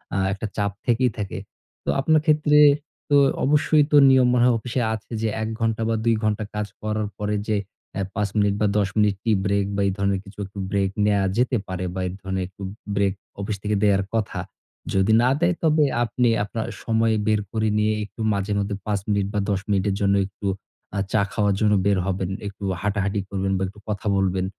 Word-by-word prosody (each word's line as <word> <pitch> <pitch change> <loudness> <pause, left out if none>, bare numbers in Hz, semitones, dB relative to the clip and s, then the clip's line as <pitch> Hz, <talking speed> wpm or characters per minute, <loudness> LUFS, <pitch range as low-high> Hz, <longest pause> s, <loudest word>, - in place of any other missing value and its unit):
আ - - +1 0.2
একটা 100 +2 -4
চাপ 100 0 0
থেকেই 125 +1 +2
থাকে। 100 -2 -4 0.5
তো - - -4
আপনার 155 +3 +3
ক্ষেত্রে 150 -1 +4 0.5
তো 145 - +4 0.3
অবশ্যই 150 +1 +4
তো 150 - +6
নিয়ম 130 -1 +5
মনে 120 -1 +3
হয় 125 -1 +4
অফিসে 125 +3 -2
আছে 110 +1 -8
যে 115 - +1
১ 110 - -1
ঘন্টা 115 -1 0
বা 115 - +1
২ 115 -1 +4
ঘন্টা 110 0 0
কাজ 105 0 -2
করার 110 0 -1
পরে 105 0 -1
যে 110 - +1 0.4
এ - - 0
৫ 105 -2 0
মিনিট 100 -1 +3
বা 105 - +4
১০ 100 -2 +2
মিনিট 105 -2 +3
টি-ব্রেক 100 -2 +1
বা 100 - 0
এই - - +1
ধরনের 100 -1 +1
কিছু 100 +1 -14
একটা 100 +1 -10
ব্রেক 100 -1 +1 0.2
নেয়া 100 -1 +3 0.2
যেতে 125 0 +2
পারে 95 -1 -3
বা 95 - -4
এই - - -4
ধরনের 95 -1 -2
একটু 95 +2 -17 0.3
ব্রেক 100 -1 +2 0.3
অফিস 100 +1 -3
থেকে 105 0 0
দেয়ার 100 -1 +3
কথা। 110 -2 -1 0.5
যদি 95 +3 +3
না 125 - +4
দেয় 175 +1 +3
তবে 155 -1 +4 0.2
আপনি 120 +1 +1
আপনার 110 +2 -4 0.2
সময় 115 0 +2
বের 110 -1 +3
করে 110 -1 0
নিয়ে 105 0 +2
একটু 110 - -11
মাঝে 100 +1 -2
মধ্যে 100 0 -2
৫ 105 -1 0
মিনিট 100 -1 +1
বা 105 - 0
১০ 100 -2 +1
মিনিটের 100 0 +1
জন্য 100 0 +3
একটু 100 +1 -7 0.5
আ - - +1
চা 110 - +3
খাওয়ার 105 -1 +2
জন্য 105 -1 +3
বের 100 -1 +3
হবেন। 95 -1 -2 0.2
একটু 100 0 -9 0.2
হাঁটাহাঁটি 100 0 0
করবেন 95 -1 -1
বা - - -3
একটু 100 +3 -12
কথা 105 0 -3
বলবেন। 95 -1 +1
105 Hz, 205 wpm, -23 LUFS, 100-115 Hz, 0.5 s, তো